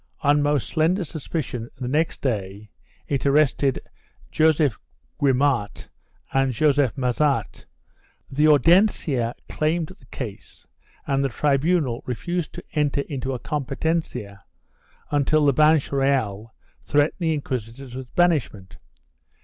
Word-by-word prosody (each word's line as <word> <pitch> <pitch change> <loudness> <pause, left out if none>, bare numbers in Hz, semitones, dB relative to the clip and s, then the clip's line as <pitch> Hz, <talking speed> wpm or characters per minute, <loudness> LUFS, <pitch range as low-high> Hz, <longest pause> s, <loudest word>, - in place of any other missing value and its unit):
On 145 +1 +3
most 145 -2 +1
slender 175 +5 +1
suspicion, 140 -6 -5
the 125 - -3
next 155 +5 0
day, 105 -4 -3 0.4
it 140 -2 -1
arrested 140 -1 +2 0.5
Joseph 155 -6 +2 0.4
Guimart 135 -5 +1 0.4
and 135 -1 +2
Joseph 145 0 +2
Massart; 135 +2 -1 0.6
the 150 +3 +2
Audiencia 150 - +3
claimed 155 +1 -1
the 130 - -21
case 110 -8 -8 0.4
and 135 0 0
the 135 - +1
tribunal 140 0 +1
refused 175 +7 -3
to 175 - -8
enter 145 -2 +1
into 135 -2 -4
a - - -2
com 150 +3 -3
petencia 135 -8 -3 0.7
until 145 +1 +2
the 140 - +4
Banch 155 0 +3
Reyal 130 -7 0 0.3
threatened 145 +4 +1
the 165 -3 +1
inquisitors 130 -2 -5
with 130 -1 -8
banishment. 150 - 0
140 Hz, 115 wpm, -23 LUFS, 125-155 Hz, 0.7 s, the